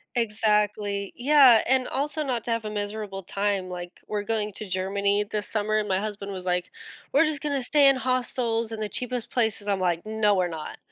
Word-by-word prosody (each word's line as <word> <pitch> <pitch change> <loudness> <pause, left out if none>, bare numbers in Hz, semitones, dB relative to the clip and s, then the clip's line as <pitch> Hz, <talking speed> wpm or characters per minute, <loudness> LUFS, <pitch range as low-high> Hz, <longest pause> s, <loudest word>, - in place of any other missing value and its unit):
Exactly, 210 -3 0
yeah, 265 -3 +6
and 260 0 +2
also 295 +3 -2
not 250 -5 -2
to 235 - -2
have 230 -1 -1
a - - -2
miserable 205 -1 -4
time, 195 0 -1
like, 175 -1 -6 0.2
we're 210 -1 -2
going 215 0 -1
to 210 0 -7
Germany 200 +2 0
this 210 -2 -2
summer 215 0 0
and 210 - 0
my 190 -1 +1
husband 205 -1 -5
was 185 -2 -6
like, 180 0 -1 0.4
"We're 325 - +5
just 305 -2 -2
gonna 285 -3 -1
stay 285 +2 +5
in 275 - +6
hostels 245 -3 -1
in 225 - -5
the 215 -1 -3
cheapest 250 0 -4
places," 220 -4 -1
I'm 200 -2 +1
like, 175 0 0
"No, 215 -1 +2
we're 180 -1 +2
not. 160 -2 -7
215 Hz, 205 wpm, -26 LUFS, 200-240 Hz, 0.4 s, yeah